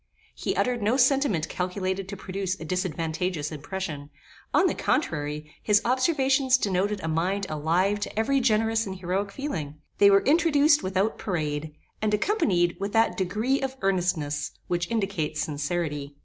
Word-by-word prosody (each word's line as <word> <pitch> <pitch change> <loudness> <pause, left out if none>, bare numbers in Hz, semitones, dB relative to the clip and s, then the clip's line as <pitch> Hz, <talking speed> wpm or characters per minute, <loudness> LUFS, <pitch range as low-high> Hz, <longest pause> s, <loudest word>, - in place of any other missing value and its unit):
He - - -3
uttered 250 -2 0
no 220 +5 +2
sentiment 260 - +3
calculated 185 +1 -3
to 200 - -6
produce 190 0 -3
a 160 - -7
disadvantageous 165 -2 -2
impression: 155 -1 -5 0.4
on - - +4
the - - +2
contrary, 150 0 -2
his 210 -1 +4
observations 265 0 +3
denoted 200 -1 0
a - - -2
mind 180 +5 0
alive 170 +7 +1
to 205 - -5
every 275 +5 +2
generous 225 -2 +2
and 190 - -5
heroic 190 +2 -2
feeling. 160 - -4 0.2
They 200 - +8
were 195 0 +5
introduced 300 -1 +4
without 190 +3 -1
parade, 150 -4 -3 0.3
and 210 -1 +2
accompanied 200 - +1
with 200 +1 -3
that 225 -5 +3
degree 215 +9 0
of 265 0 -3
earnestness 175 -7 0
which 175 0 -2
indicates 195 -9 -1
sincerity. 145 -1 -3
190 Hz, 150 wpm, -26 LUFS, 160-225 Hz, 0.4 s, They